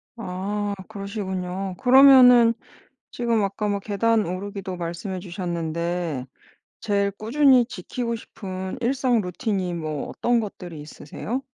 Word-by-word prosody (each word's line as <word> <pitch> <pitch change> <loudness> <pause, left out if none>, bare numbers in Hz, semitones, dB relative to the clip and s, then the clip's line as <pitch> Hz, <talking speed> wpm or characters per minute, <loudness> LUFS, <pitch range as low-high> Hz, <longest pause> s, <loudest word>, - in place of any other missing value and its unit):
아 205 0 -3 0.2
그러시군요. 195 -2 -4
그러면은 250 -3 +8 0.6
지금 235 -3 0
아까 200 +2 -2
막 200 -1 -1
계단 220 +2 +1
오르기도 190 +1 -5
말씀해 175 +2 -5
주셨는데 170 -4 -3 0.5
제일 200 -1 0
꾸준히 250 +5 +4
지키고 235 +3 -4
싶은 190 -3 -7
일상 250 -1 +1
루틴이 185 -1 -2
뭐 155 -3 -4
어떤 240 0 +1
것들이 180 -7 -7
있으세요? 205 - -6
200 Hz, 275 characters per minute, -24 LUFS, 180-230 Hz, 0.6 s, 그러면은